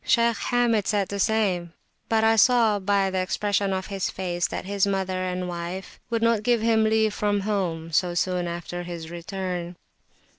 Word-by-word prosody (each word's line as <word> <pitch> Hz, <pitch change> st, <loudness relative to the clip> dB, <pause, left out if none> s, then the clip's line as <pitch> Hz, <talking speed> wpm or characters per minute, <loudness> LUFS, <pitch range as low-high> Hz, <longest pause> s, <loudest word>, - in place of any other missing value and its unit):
Shaykh 235 Hz, 0 st, +3 dB
Hamid 235 Hz, -4 st, +2 dB
said 205 Hz, -3 st, +1 dB
the 200 Hz, -, -4 dB
same, 190 Hz, -6 st, +1 dB, 0.4 s
but 220 Hz, -1 st, +2 dB
I 225 Hz, 0 st, +5 dB
saw, 225 Hz, -2 st, +4 dB
by 195 Hz, 0 st, +1 dB
the 190 Hz, -, 0 dB
expression 200 Hz, +1 st, 0 dB
of 190 Hz, 0 st, -2 dB
his 195 Hz, -2 st, -2 dB
face, 175 Hz, -2 st, -2 dB
that -, -, -5 dB
his 200 Hz, 0 st, +1 dB
mother 190 Hz, -2 st, -1 dB
and 180 Hz, 0 st, -2 dB
wife 175 Hz, +2 st, -6 dB
would 230 Hz, -1 st, -1 dB
not 230 Hz, -2 st, +3 dB
give 240 Hz, +1 st, +2 dB
him 220 Hz, -1 st, +3 dB
leave 220 Hz, -1 st, +2 dB
from 205 Hz, -1 st, 0 dB
home 180 Hz, -6 st, -2 dB
so 175 Hz, +2 st, +1 dB
soon 180 Hz, 0 st, 0 dB
after 175 Hz, +1 st, -5 dB
his 170 Hz, -2 st, -7 dB
return. 175 Hz, 0 st, -4 dB
195 Hz, 180 wpm, -25 LUFS, 180-220 Hz, 0.4 s, I